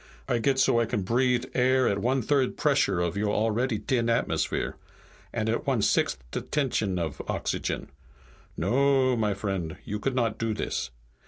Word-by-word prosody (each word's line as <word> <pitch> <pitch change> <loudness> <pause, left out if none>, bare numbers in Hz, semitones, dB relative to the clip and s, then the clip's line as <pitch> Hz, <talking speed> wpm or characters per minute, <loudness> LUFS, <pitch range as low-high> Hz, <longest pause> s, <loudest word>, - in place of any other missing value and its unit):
I 120 - +1
get 135 +3 +2
so 120 - +4
I 115 - +1
can 100 - -1
breathe 125 +4 +2
air 130 0 +3
at 100 - +1
one 125 +4 +1
third 135 +1 +2
the - - -10
pressure 140 - +2
of 85 -1 -1
your 105 +1 0
already 115 +2 +1
t'in 115 +1 0
atmosphere. 115 - 0 0.6
And - - -2
at - - -1
one - - +2
sixt' 65 - +1
the - - -2
tension 115 -10 -1
of 80 -4 -3
oxygen. - - -2 0.7
No, 135 0 +3
my 105 -3 0
vriend, 95 -5 -3
you 105 - -3
could 130 +4 -1
not 115 -4 0
do 115 -1 -1
this. - - -3
115 Hz, 175 wpm, -27 LUFS, 105-130 Hz, 0.7 s, so